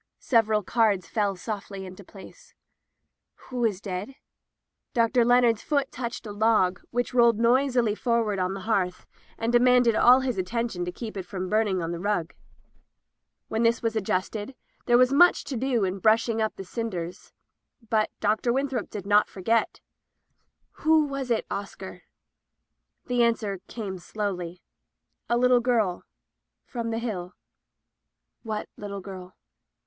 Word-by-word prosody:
Several 220 -3 +2
cards 210 -4 +1
fell 205 -3 0
softly 195 0 -6
into 185 +2 -10
place. 195 +1 -15 0.9
"Who 250 -1 -2
is 210 -5 +1
dead?" 200 +5 -5 0.8
Dr. 235 +1 +3
Leonard's 240 -2 +4
foot 280 -2 0
touched 240 -1 -5
a 210 - -6
log, 205 -4 +2
which 245 +1 -2
rolled 235 -3 +5
noisily 245 -1 +3
forward 225 -3 0
on 185 +1 -1
the 195 - -6
hearth 185 -4 -1 0.3
and 230 +1 -1
de 240 - +6
manded 245 -2 +4
all 250 +3 +6
his 250 -6 -2
attention 195 -1 -2
to 180 - -3
keep 220 +4 -7
it 190 - -5
from 185 -1 -4
burning 215 -3 +1
the 170 -1 -3
rug. 180 -4 -1 1.1
When 220 - -1
this 230 0 +2
was 225 -1 0
adjusted, 205 +4 -2 0.3
there 240 -1 +5
was 255 +2 +4
much 350 +5 +5
to 275 - -5
do 245 -2 0
in 190 +1 -1
brushing 225 +2 +2
up 220 - -1
die 195 - -7
cin 230 +5 -4
ders. 175 -1 -7 0.6
But 215 -1 +1
Dr. 215 +3 +1
Winthrop 265 -3 -1
did 200 -3 -7
not 205 +1 +4
forget. 225 +4 0 1.0
"Who 315 -1 +4
was 275 -2 -4
it, 230 -2 +1
Oscar?" 190 -2 -7 1.0
The 245 -2 +1
answer 220 -4 +1
came 195 -5 -6
slowly 180 -3 -4 0.3
— - - -51
"A 235 - +3
little 250 0 +4
girl— 225 -7 0 0.6
from 235 -2 -4
the 225 - -2
Hill." 205 -6 -4 1.1
"What 215 -2 -4
little 200 -1 -6
girl?" 185 -1 -10
220 Hz, 150 wpm, -26 LUFS, 195-240 Hz, 1.1 s, de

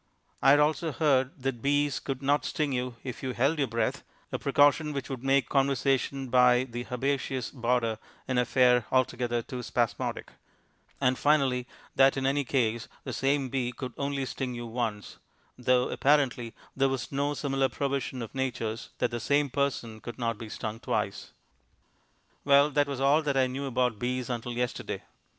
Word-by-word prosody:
I - - +5
had 145 +1 +7
also 155 +2 +2
heard 135 +1 +1
that 135 -4 -2
bees 145 +1 +1
could 135 -1 -5
not 140 0 +2
sting 150 +1 -1
you 125 -1 -2
if 130 -2 -6
you 130 -1 -3
held 140 +6 +1
your 140 - +2
breath, 115 0 -1 0.3
a - - -2
precaution 145 +2 +3
which 140 -1 -4
would 130 -2 -5
make 135 0 +3
conversation 135 -1 +1
by 125 0 +5
the 120 -1 -6
herbaceous 130 0 -1
border 120 -3 0 0.3
an 130 -2 +1
affair 125 -1 +3
altogether 120 -2 +1
too 125 +1 -6
spasmodic; - - -2 0.7
and, 130 -1 +2
finally, 135 -4 +2 0.3
that 135 0 +5
in 135 - -1
any 140 +1 +2
case 120 -4 0 0.2
the - - -5
same 135 -1 +1
bee 125 -2 -1
could 125 0 -6
only 140 -1 -2
sting 130 -1 -4
you 120 0 -5
once 115 -3 -4 0.4
though, 125 0 +2
apparently, 135 -5 +1 0.2
there 135 0 +3
was 135 -2 -3
no 145 +1 0
similar 135 -2 0
provision 135 -1 -2
of 115 - -9
Nature's 125 -4 -3
that - - 0
the 120 - -3
same 140 +4 +1
person 125 -5 -1
could 120 0 -8
not 115 -3 -2
be 115 - -7
stung 110 +1 -5
twice. - - -2 1.1
Well, 140 +1 +5
that 145 0 +2
was 140 -2 -4
all 140 +3 +4
that 140 -3 -1
I 130 - +4
knew 130 +2 -4
about 125 -4 0
bees 125 0 -2
until 120 0 -4
yesterday. 125 0 -3
130 Hz, 175 wpm, -28 LUFS, 125-140 Hz, 1.1 s, had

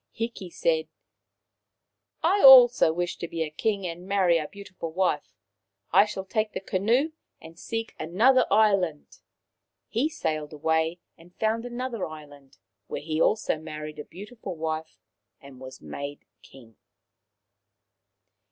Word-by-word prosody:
Hiki 225 -5 -5
said: 165 -2 0 1.4
"I 380 +5 +3
also 250 -9 +9
wish 175 +2 -3
to 170 - -5
be 165 0 -2
a 155 - -6
king 200 +4 -1
and 175 +1 -6
marry 185 -4 +3
a 150 - -4
beautiful 185 -4 -8
wife. 160 -9 -1 0.6
I 200 - +6
shall 195 -2 -6
take 215 +2 -1
the - - -3
canoe 230 - +1 0.3
and 165 +1 -14
seek 225 0 -4
another 230 +11 +3
island." 195 -7 +1 0.7
He 250 +8 0
sailed 155 - -3
away 160 +3 0 0.2
and 175 +2 -19
found 225 +2 -1
another 245 -3 -4
island, 145 -3 -13 0.3
where - - -4
he 155 +1 -2
also 215 -7 +1
married 155 -1 -8
a - - -5
beautiful 205 +1 -9
wife 160 0 -4 0.4
and 135 -2 -14
was 130 0 -11
made 140 0 -7 0.2
king. 115 -5 -17
175 Hz, 135 wpm, -26 LUFS, 155-215 Hz, 1.4 s, also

